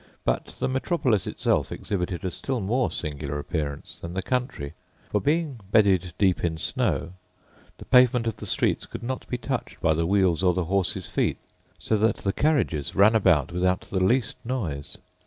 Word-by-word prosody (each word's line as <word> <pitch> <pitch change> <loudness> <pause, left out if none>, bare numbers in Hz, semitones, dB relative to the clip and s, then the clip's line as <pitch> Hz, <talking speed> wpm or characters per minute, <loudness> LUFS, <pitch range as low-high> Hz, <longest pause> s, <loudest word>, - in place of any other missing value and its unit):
But - - +1
the - - 0
metropolis 130 - 0
itself - - 0
exhibited 90 -3 -3
a 90 - -1
still 130 +5 -2
more 120 +6 +1
singular 75 -2 -4
appearance 75 -1 -4
than 85 +2 -6
the 95 - -2
country; 125 - -2 0.4
for, 105 - +1
being 150 -3 0
bedded 95 -5 +3
deep 95 -3 +2
in 80 -2 0
snow, 85 +2 -1 0.6
the - - -11
pavement 125 -2 +5
of 115 -3 -2
the - - -8
streets - - +1
could - - -8
not 130 +2 -4
be 125 - -1
touched 130 0 -4
by 80 -2 +3
the 80 +1 0
wheels 95 -3 +2
or 90 -1 +3
the 90 -2 0
horses' 95 +1 -1
feet, - - 0 0.4
so 110 - 0
that 110 +2 +2
the 95 - -2
carriages 105 - 0
ran 100 +3 +6
about 90 -8 +3
without 90 +1 +1
the 95 - +1
least 120 +4 +1
noise. 90 - -3
95 Hz, 175 wpm, -26 LUFS, 85-120 Hz, 0.6 s, ran